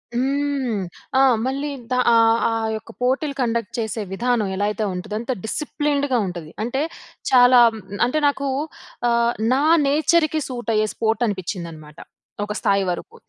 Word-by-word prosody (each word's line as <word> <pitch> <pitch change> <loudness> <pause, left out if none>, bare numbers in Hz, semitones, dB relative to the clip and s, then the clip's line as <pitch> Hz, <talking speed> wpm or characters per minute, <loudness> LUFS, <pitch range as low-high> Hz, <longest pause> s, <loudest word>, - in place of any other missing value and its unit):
హ్మ్. 270 -4 0 0.4
ఆ! - - +6 0.2
మళ్ళీ 275 +3 -2 0.2
దా 250 - +2
ఆహ్, 230 0 +5
ఆ - - -1 0.3
యొక్క 225 - -12
పోటీలు 270 +3 0
కండక్ట్ 230 -3 -1
చేసే 220 0 -2
విధానం, 235 0 0
ఎలా 205 +1 0
అయితే 215 - -3
ఉంటుందో, 210 +4 -5
అంత 240 - -3
డిసిప్లిన్డ్‌గా 285 -1 -1
ఉంటది. 170 -3 -7
అంటే 255 +5 -1 0.5
చాలా 250 -1 +7 0.5
అంటే 310 +5 0
నాకు 280 0 -1 0.6
ఆహ్, 235 0 +2 0.2
నా 270 - +2 0.3
నేచర్‌కి 310 +2 +2
సూట్ 240 -2 -5
అయ్యే 215 0 +2
స్పోర్ట్ 225 +1 0
అనిపించిందనమాట. 170 -6 -6 0.5
ఒక 210 - -3
స్థాయి 200 0 +2
వరకు. 405 - -6
240 Hz, 140 wpm, -22 LUFS, 210-275 Hz, 0.6 s, చాలా